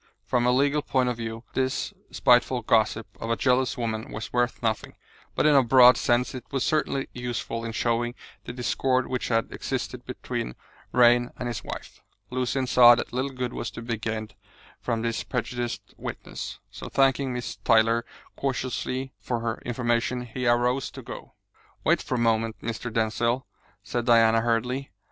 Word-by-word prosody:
From 120 Hz, 0 st, +1 dB
a -, -, +5 dB
legal 140 Hz, +3 st, +2 dB
point 130 Hz, -3 st, +1 dB
of 120 Hz, -, -2 dB
view 115 Hz, 0 st, -5 dB
this 130 Hz, 0 st, -1 dB, 0.2 s
spiteful -, -, +3 dB
gossip -, -, +2 dB
of 115 Hz, -, -4 dB
a 115 Hz, -, +2 dB
jealous 130 Hz, +1 st, +2 dB
woman 110 Hz, -2 st, -3 dB
was 110 Hz, +1 st, -6 dB
worth 120 Hz, 0 st, 0 dB
nothing, 110 Hz, -2 st, -1 dB, 0.4 s
but -, -, +2 dB
in 150 Hz, -, +6 dB
a 140 Hz, -, +7 dB
broad 125 Hz, 0 st, +7 dB
sense 120 Hz, +1 st, +1 dB
it 130 Hz, -2 st, -6 dB
was 135 Hz, -3 st, -1 dB
certainly 150 Hz, -3 st, 0 dB
useful 120 Hz, -2 st, -4 dB
in 115 Hz, -, -3 dB
showing 120 Hz, +1 st, 0 dB, 0.3 s
the -, -, -5 dB
discord 130 Hz, +1 st, 0 dB
which 125 Hz, -1 st, -3 dB
had 115 Hz, -1 st, 0 dB
existed -, -, -4 dB
between -, -, -5 dB, 0.4 s
Vrain 120 Hz, 0 st, +5 dB
and 125 Hz, -, -4 dB
his 115 Hz, -4 st, -4 dB
wife. -, -, -8 dB, 0.3 s
Lucian 130 Hz, +1 st, 0 dB
saw 120 Hz, -1 st, +8 dB
that 120 Hz, -, -4 dB
little 130 Hz, +3 st, -1 dB
good 125 Hz, -2 st, -4 dB
was 120 Hz, -, -3 dB
to 115 Hz, +3 st, -8 dB
be 115 Hz, 0 st, -2 dB
gained 110 Hz, -1 st, -4 dB, 0.5 s
from 115 Hz, -1 st, -2 dB
this 115 Hz, -1 st, -1 dB
prejudiced 120 Hz, -1 st, -4 dB
witness, -, -, -6 dB
so -, -, -8 dB
thanking 135 Hz, 0 st, +2 dB
Miss 125 Hz, -1 st, -4 dB
Tyler 115 Hz, +1 st, +3 dB, 0.3 s
courteously 130 Hz, 0 st, -2 dB
for 120 Hz, -2 st, -3 dB
her 115 Hz, 0 st, -3 dB
information, 120 Hz, 0 st, 0 dB
he 125 Hz, +2 st, -3 dB
arose 125 Hz, +2 st, +2 dB
to -, -, -10 dB
go. -, -, -9 dB, 0.5 s
"Wait -, -, +3 dB
for 130 Hz, -, -3 dB
a -, -, 0 dB
moment, 115 Hz, -1 st, +1 dB
Mr. 115 Hz, +1 st, -4 dB
Denzil," 115 Hz, +3 st, 0 dB, 0.4 s
said 120 Hz, -1 st, -2 dB
Diana 115 Hz, -1 st, +5 dB
hurriedly. 125 Hz, +4 st, -1 dB
120 Hz, 170 wpm, -26 LUFS, 115-130 Hz, 0.5 s, saw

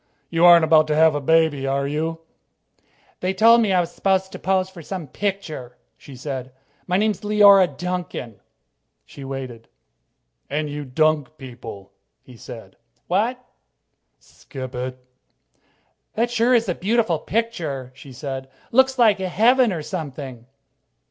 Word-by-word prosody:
"You 165 Hz, +1 st, +3 dB
aren't 170 Hz, -2 st, +8 dB
about 155 Hz, -1 st, +4 dB
to 150 Hz, -, 0 dB
have 160 Hz, 0 st, +5 dB
a 145 Hz, -, -2 dB
baby, 155 Hz, -2 st, +2 dB
are 140 Hz, +1 st, 0 dB
you?" 160 Hz, +3 st, -3 dB, 1.0 s
"They 185 Hz, +1 st, -2 dB
told 230 Hz, +1 st, +6 dB
me 215 Hz, -3 st, +1 dB
I 185 Hz, -, +3 dB
was 175 Hz, -1 st, -1 dB
supposed 190 Hz, -1 st, 0 dB
to -, -, -8 dB
pose 190 Hz, -1 st, +1 dB
for 190 Hz, -2 st, -12 dB
some 180 Hz, +1 st, -6 dB
picture," 160 Hz, -10 st, -5 dB, 0.2 s
she 140 Hz, -, -13 dB
said. 130 Hz, -1 st, -6 dB, 0.4 s
"My 180 Hz, 0 st, +1 dB
name's 210 Hz, -1 st, 0 dB
Leora 205 Hz, -3 st, +6 dB
Duncan." 175 Hz, -, -5 dB, 0.7 s
She 140 Hz, -, -12 dB
waited. 130 Hz, -4 st, -7 dB, 0.8 s
"And 150 Hz, 0 st, -2 dB
you 145 Hz, 0 st, -5 dB
dunk 155 Hz, +2 st, 0 dB
people," 115 Hz, -7 st, -10 dB, 0.3 s
he 125 Hz, -, -15 dB
said. 115 Hz, -, -11 dB, 0.3 s
"What?" 235 Hz, +7 st, -1 dB, 0.7 s
she -, -, -36 dB
said. -, -, -24 dB
"Skip 130 Hz, -2 st, -8 dB
it," 125 Hz, -, -5 dB
he 130 Hz, +1 st, -2 dB
said. 130 Hz, 0 st, -16 dB, 1.1 s
"That 235 Hz, +2 st, 0 dB
sure 240 Hz, +1 st, +3 dB
is 230 Hz, -2 st, +2 dB
a 180 Hz, -, 0 dB
beautiful 200 Hz, -3 st, 0 dB
picture," 165 Hz, -, -3 dB
she 135 Hz, +1 st, -13 dB
said. 135 Hz, 0 st, -6 dB, 0.2 s
"Looks 265 Hz, +2 st, +4 dB
just -, -, -20 dB
like 220 Hz, -5 st, +4 dB
heaven 225 Hz, +6 st, +3 dB
or 165 Hz, -4 st, -4 dB
something." 140 Hz, -8 st, -7 dB
160 Hz, 155 wpm, -22 LUFS, 135-195 Hz, 1.1 s, aren't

